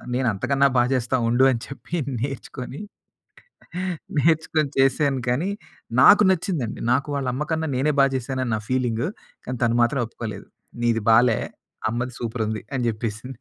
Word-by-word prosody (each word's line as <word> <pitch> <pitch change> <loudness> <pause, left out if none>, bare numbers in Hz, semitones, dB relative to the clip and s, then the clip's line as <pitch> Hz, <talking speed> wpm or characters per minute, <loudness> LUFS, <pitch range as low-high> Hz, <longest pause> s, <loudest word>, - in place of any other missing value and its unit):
నేను 130 -1 0
అంతకన్నా 140 +7 +2
బా 120 - +5
చేస్తా 130 0 0
ఉండు 125 +3 +3
అని 115 -2 -2
చెప్పి 135 +5 -7 0.2
నేర్చుకొని 135 - -5 1.4
నేర్చుకొని 155 -1 +2
చేశాను. 135 0 +2
కానీ 165 +11 0 0.5
నాకు 205 +1 +8
నచ్చిందండి. 160 - -2
నాకు 140 +3 +1
వాళ్ళ 135 -2 -2
అమ్మ 145 - -2
కన్నా 160 0 -1
నేనే 150 +4 +2
బా 135 - +7
చేశాను 130 +1 -3
అని 120 - -2
నా - - -4
ఫీలింగు. 125 +2 0 0.4
కానీ 125 - -3
తను 115 0 +2
మాత్రం 135 +2 +1
ఒప్పుకోలేదు. 110 -3 -7 0.4
"నీది 115 -2 +1
బాలే. 115 0 +5 0.5
అమ్మది 120 +2 -3
సూపరుంది" 110 -2 -3
అని 125 - -1
చెప్పేసింది. 115 +3 -5
130 Hz, 150 wpm, -23 LUFS, 115-140 Hz, 1.4 s, నాకు